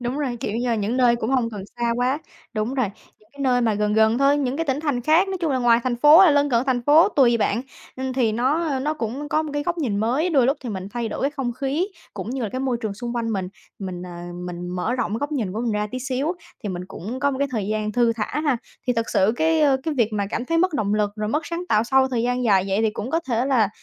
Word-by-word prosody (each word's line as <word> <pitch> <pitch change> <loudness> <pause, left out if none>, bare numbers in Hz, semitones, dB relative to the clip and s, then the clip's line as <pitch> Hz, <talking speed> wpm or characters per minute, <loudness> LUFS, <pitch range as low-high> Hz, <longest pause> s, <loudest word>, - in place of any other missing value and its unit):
đúng 245 +3 -3
rồi, 260 -5 -2
kiểu - - -3
như 245 +1 -1
là 235 - +2
những 215 +3 -1
nơi 245 -2 +4
cũng 230 0 -3
hông 250 -4 +1
cần 205 -3 -6 0.2
xa 235 0 +1
quá. 255 +3 +1 0.3
Đúng 225 +3 -2
rồi, 255 -5 +1 0.3
những 215 - -27
cái 280 - -13
nơi 250 -2 +3
mà 225 -3 +2
gần 210 0 0
gần 220 +2 +4
thôi, 275 +1 +4
những 270 -2 -1
cái 330 - -1
tỉnh 270 +1 0
thành 290 -6 -1
khác, 320 +9 +3
nói 385 - -2
chung 330 -3 0
là 260 - +1
ngoài 240 -1 +4
thành 245 -2 0
phố, 295 +5 +7
hay 370 -5 +7
lân 285 0 +2
cận 235 -1 +3
thành 250 -2 +1
phố 300 +8 +6
tùy 255 - +4
bạn. 230 +2 0 0.3
Ừm 260 0 -3
thì 245 -4 +1
nó, 260 +9 +1
ơ, 280 -5 -1
nó 300 +3 -1
cũng 275 +2 -4
có 310 - +1
một 310 - -5
cái 290 0 -1
góc 345 +2 -2
nhìn 235 -10 -1
mới, 255 - +1
đôi 270 -6 +4
lúc 275 - +2
thì 255 - -6
mình 190 -3 -5
thay 235 -2 -2
đổi - - -5
cái 275 - +2
không 270 -4 -3
khí, 280 +9 -1 0.3
cũng 205 +2 -5
như 260 0 -3
là 220 - -1
cái 255 +5 -4
môi 260 -2 0
trường 215 -3 -3
xung 240 +3 -5
quanh 230 -1 -1
mình, 190 -3 -2 0.3
mình, 185 -3 -5
ờ, 180 - -8 0.4
mình 175 0 -6
mở 180 +7 -2
rộng 245 -4 -2
cái 225 - -1
góc 285 +3 -3
nhìn 225 -10 -2
của 220 - -3
mình 235 -3 -1
ra 210 0 -1
tí 255 - -4
xíu, 270 +5 -1 0.3
thì 210 - -3
mình 180 -1 -4
cũng 220 +7 -6
có 285 0 +2
một 265 - -4
cái 280 0 0
thời 220 -6 -2
gian 215 0 -2
thư 235 0 +3
thả 225 +6 -3
ha. 290 -5 +1 0.3
Thì 250 - +3
thật 230 -1 -2
sự 195 +3 +3
cái, 320 0 +2
ơ, 280 -3 +4
cái 315 +1 -2
việc 230 -5 +1
mà 205 -1 -1
cảm 240 - -2
thấy 330 +5 0
mất 365 0 +2
động 210 -3 0
lực, 210 -1 +1
rồi 210 0 -2
mất 300 +8 -1
sáng 340 +1 -4
tạo 215 +1 +3
sau 265 +2 +3
thời 240 -3 -1
gian 245 +1 0
dài 195 -5 +4
vậy, 195 +1 +1
thì 220 - +2
cũng 215 +4 -5
có 330 - +1
thể 240 +1 +1
là 240 -7 +3
245 Hz, 300 wpm, -23 LUFS, 220-280 Hz, 0.4 s, phố